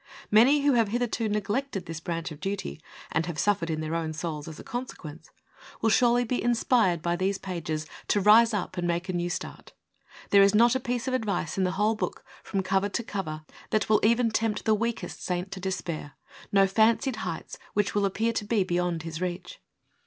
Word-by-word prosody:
Many 255 +7 +6
who 285 -1 +3
have 230 -3 +3
hitherto 230 0 -1
neglected 210 +1 -2
this 165 -1 -6
branch 165 0 -4
of 150 - -9
duty, 195 - -4 0.3
and 165 - 0
have 170 -3 -4
suffered 175 -2 +1
in 155 -1 -2
their 155 +1 -3
own 165 -1 -2
souls 155 -2 -4
as 160 -2 -8
a - - -9
consequence, 175 - -7 0.5
will 225 - +2
surely 245 +1 +4
be 245 +1 -2
inspired 230 -7 +2
by 170 0 +1
these 190 +2 0
pages 160 -5 -4 0.2
to 205 - +2
rise 220 +4 +6
up 205 -4 -3
and 175 0 -1
make 175 +2 -1
a - - -1
new 175 0 -1
start. 175 - -6 0.6
There 200 - +7
is 200 +1 +5
not 235 +2 +6
a 260 - +1
piece 245 0 -3
of 260 - -1
advice 215 -7 -1
in 190 - +1
the 185 - -1
whole 210 +3 +2
PREFACE. 215 - -2
VII - - -15
book, - - -26 0.2
from 195 -2 -2
cover 195 +2 +1
to 235 - -2
cover, 155 -8 -5 0.3
that 215 - +1
v^ill 215 - +3
even 230 +1 +3
tempt 220 -1 -1
the 220 - +4
weakest 230 +2 -3
saint 180 +1 -2
to 195 - -6
despair, 175 -5 -4 0.4
no 195 -1 +5
fancied 220 +5 +2
heights 180 -7 -5 0.2
which 205 -1 +1
will 205 -1 +2
appear 225 +4 0
to 220 - -1
be 210 -1 +1
beyond 175 -2 -1
his 165 0 -6
reach. 180 0 -5
195 Hz, 210 wpm, -27 LUFS, 175-225 Hz, 0.6 s, There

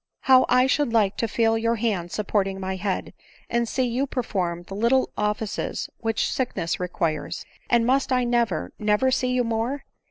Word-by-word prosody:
How 260 -1 +5
I 250 0 +5
should 285 -1 +1
like 210 -4 +2
to 230 - 0
feel 225 0 +2
your 230 +1 +1
hand 205 -7 -1
supporting 195 -2 -1
my 190 0 -3
head, 190 0 -3 0.4
and. 235 -1 +1
see 260 - 0
you 250 +3 0
perform 180 -9 -2
the 195 - -10
little 235 +6 +2
offices 210 0 -2
which 225 -1 0
sickness 240 -10 -2
requires. 170 -3 -2 0.2
And 235 -1 +3
must 265 +2 +2
I 250 -1 +3
never, 235 - 0
never 210 +5 +2
see 255 0 +1
you 250 0 +2
more 230 +5 -2
230 Hz, 170 wpm, -24 LUFS, 195-250 Hz, 0.4 s, How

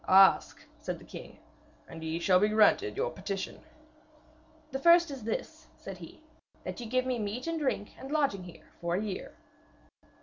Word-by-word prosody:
'Ask,' 190 +1 +6
said - - -4
the - - -15
king, - - -10 0.5
'and 165 -1 -9
ye 160 +1 -2
shall 180 +1 +4
be 210 - +4
granted 220 - +4
your - - 0
petition.' - - -4 1.1
'The 270 - -2
first 340 +1 +6
is 260 -6 -7
this,' 315 +8 -4
said 195 -2 -8
he, 175 - -12 0.4
'that - - -5
ye 240 - -5
give 255 +2 +1
me 255 -2 -1
meat 215 +4 -3
and 330 -1 -1
drink 260 -8 -1
and 265 - -8
lodging 280 -11 +1
here 175 - -13
for 170 0 0
a 200 - 0
year.' 200 -3 -5
220 Hz, 175 wpm, -30 LUFS, 190-290 Hz, 1.1 s, Ask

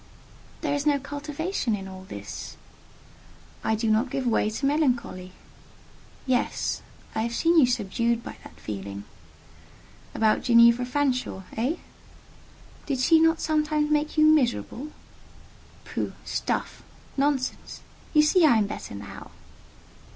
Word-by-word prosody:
"There 295 -3 0
is 285 +1 -1
no 290 -1 +4
cultivation 290 - -3
in 195 -1 -7
all 190 0 -10
this." 100 - -8 1.1
"I 220 - +1
do 225 +1 -1
not 225 +5 +2
give 265 +1 -2
way 225 -3 +2
to 220 +6 -3
melancholy." 250 -11 0 0.9
"Yes: 255 -2 0 0.3
I 220 - -1
have 235 +1 -2
seen 335 +4 +4
you 265 - +6
subdued 235 0 0
by - - -8
that - - -14
feeling." 100 -1 -6 1.1
"About 220 -1 +3
Ginevra 235 0 +5
Fanshawe—eh?" 250 - -1 1.1
"Did 275 -3 0
she 320 +5 +5
not 325 0 +3
sometimes 305 -1 +1
make 300 +1 0
you 310 - +6
miserable?" 290 -2 +2 1.0
"Pooh! - - -3
stuff! - - -2 0.3
nonsense! 275 -2 -1 0.3
You 300 -1 +5
see 335 +4 +4
I 280 -7 +6
am 215 - +2
better 200 - -7
now." 100 0 -9
255 Hz, 125 wpm, -26 LUFS, 220-300 Hz, 1.1 s, you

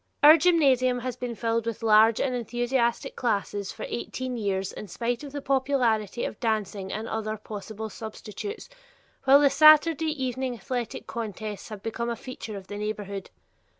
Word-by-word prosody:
Our 300 +2 +11
gymnasium 275 -7 +3
has 255 0 -3
been 245 -2 -5
filled 230 +1 -1
with 230 0 -4
large 220 +1 +5
and 260 - 0
enthusiastic 240 0 -1
classes 205 -3 -1
for - - -7
eighteen 255 +1 -4
years 195 -4 -2
in 210 - -8
spite 235 - -2
of 285 - -8
the 285 0 -6
popularity 250 -6 +1
of - - -6
dancing 210 -4 -2
and 220 +2 -4
other 215 0 -3
possible 215 +1 -7
substitutes, 220 - -7 0.6
while 275 +2 +8
the 280 -2 +5
Saturday 310 +2 +6
evening 260 -3 -2
athletic 240 +2 -4
contests 215 -2 -5
have 210 -3 -8
become 235 +1 -3
a 235 - -1
feature 230 -4 -7
of 195 - -9
the 205 - -7
neighborhood. 205 -2 -4
235 Hz, 160 wpm, -26 LUFS, 215-260 Hz, 0.6 s, Our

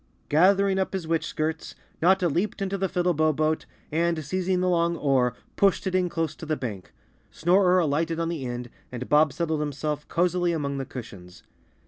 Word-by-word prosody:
Gathering 190 +4 +4
up 190 - -1
his 185 -4 -3
witch 165 -1 0
skirts, 155 +1 -3 0.3
Notta 185 +1 +4
leaped 180 +7 -1
into 195 0 -2
the 190 -1 -1
Fiddlebow 170 -4 +2
Boat 155 +1 0 0.2
and, 165 0 0
seizing 185 +4 0
the 185 - +1
long 170 -1 +2
oar, 130 -5 +2 0.2
pushed 195 -1 +3
it 190 - -1
in 185 -1 +2
close 165 -3 -2
to - - -8
the 155 -1 0
bank. 105 -8 -6 0.4
Snorer 180 +2 +3
alighted 165 0 +1
on 165 0 -1
the 165 -5 -4
end, 120 0 -5 0.2
and 125 0 -5
Bob 150 0 +4
settled 160 +1 -1
himself 150 0 -3
cozily 175 0 +1
among 140 -3 -2
the 135 - -3
cushions. 100 -9 -10
165 Hz, 180 wpm, -26 LUFS, 145-180 Hz, 0.4 s, Gathering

